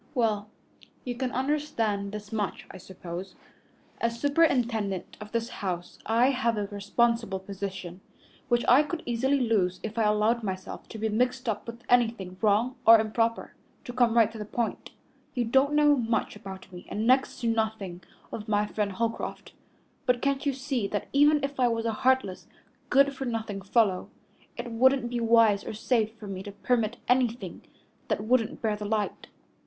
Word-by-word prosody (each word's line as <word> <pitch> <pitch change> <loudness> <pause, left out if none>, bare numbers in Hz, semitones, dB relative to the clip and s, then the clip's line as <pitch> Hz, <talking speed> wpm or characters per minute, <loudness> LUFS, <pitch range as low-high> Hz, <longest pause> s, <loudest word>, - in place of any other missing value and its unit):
"Well, 215 -4 0 0.6
you 250 - -2
can 250 +1 -3
understand 245 -8 -1
this 210 0 -8
much, 210 -3 -2
I - - -10
suppose. 185 0 -8 0.6
As 230 0 -1
superintendent 240 - +1
of 210 0 -9
this 230 0 -1
house 180 -3 -4
I 235 +4 +4
have 235 -4 0
a 205 - -1
responsible 215 +1 0
position, 190 -2 -6 0.5
which 240 -1 +1
I 255 +4 +7
could 315 +2 -4
easily 260 +4 +1
lose 205 -7 +1
if 220 +1 -4
I 220 - +3
allowed 210 +3 +2
myself 190 -3 -6
to - - -8
be 220 +1 -1
mixed 250 +3 0
up 215 0 -2
with 235 +1 -8
anything 225 -7 +2
wrong 220 +5 +2
or 225 0 +9
improper. 225 +1 -1 0.3
To 245 - -6
come 240 -2 +3
right 225 -1 +5
to 225 - -9
the - - -3
point, 230 +2 -3 0.5
you 245 -2 +1
don't 265 +5 +3
know 295 -1 +5
much 230 -4 -1
about 190 -2 -10
me 180 - -10
and 215 +2 -2
next 260 +3 +3
to 235 - 0
nothing 220 -5 -1 0.3
of 215 0 -6
my 210 -1 +2
friend 210 -1 -2
Holcroft, 230 +3 -3 0.5
but 250 -1 +3
can't 275 +2 0
you 280 - +2
see 260 -5 -2
that 205 +1 -3
even 295 +1 +5
if 275 -1 -3
I 250 - +4
was 230 -1 -1
a 225 - 0
heartless, 255 -5 +1 0.4
good 275 +1 +4
for 270 0 -5
nothing 220 -4 -3
fellow, 195 -2 +1 0.5
it 240 0 -5
wouldn't 250 +1 +3
be 240 - -1
wise 225 -3 +4
or - - -6
safe 220 0 +1
for 220 -1 -11
me 195 -2 -5
to 205 +1 -7
permit 230 +2 0
anything 250 -1 0 0.5
that - - 0
wouldn't 235 0 +1
bear 215 -2 +1
the 210 - -7
light?" 210 -1 -2
225 Hz, 175 wpm, -28 LUFS, 205-250 Hz, 0.6 s, or